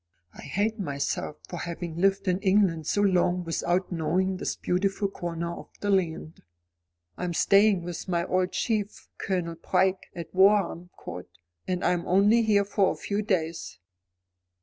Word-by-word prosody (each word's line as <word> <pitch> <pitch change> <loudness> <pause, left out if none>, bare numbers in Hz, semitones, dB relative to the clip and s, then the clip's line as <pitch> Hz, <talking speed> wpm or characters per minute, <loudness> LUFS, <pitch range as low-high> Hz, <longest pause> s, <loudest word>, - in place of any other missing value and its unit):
I - - -11
hate 215 +3 -1
myself 145 -2 -3
for 175 - -6
having 170 -1 -5
lived 195 0 +2
in 185 0 +2
England 190 -5 +2
so 205 - +1
long 180 -2 +2
without 175 +3 -1
knowing 185 +3 0
this - - -3
beautiful 195 +3 0
corner 170 -3 -4
of - - -11
the 205 - -1
land. 165 -4 -1 0.8
I - - -5
am 175 -1 -2
staying 200 -1 +4
with 175 +1 -6
my 170 -2 0
old 185 0 0
chief, 210 -3 -2
Colonel 170 -3 -2
Pryke, 190 +3 +1
at 170 -2 -7
Warham 190 -2 +3
Court, 90 +1 -8 0.4
and 180 -1 -1
I'm 175 -1 +1
only 205 +5 +4
here 205 -3 +3
for 200 -1 +2
a - - -4
few 205 +1 -2
days." 170 - -2
185 Hz, 155 wpm, -27 LUFS, 170-200 Hz, 0.8 s, staying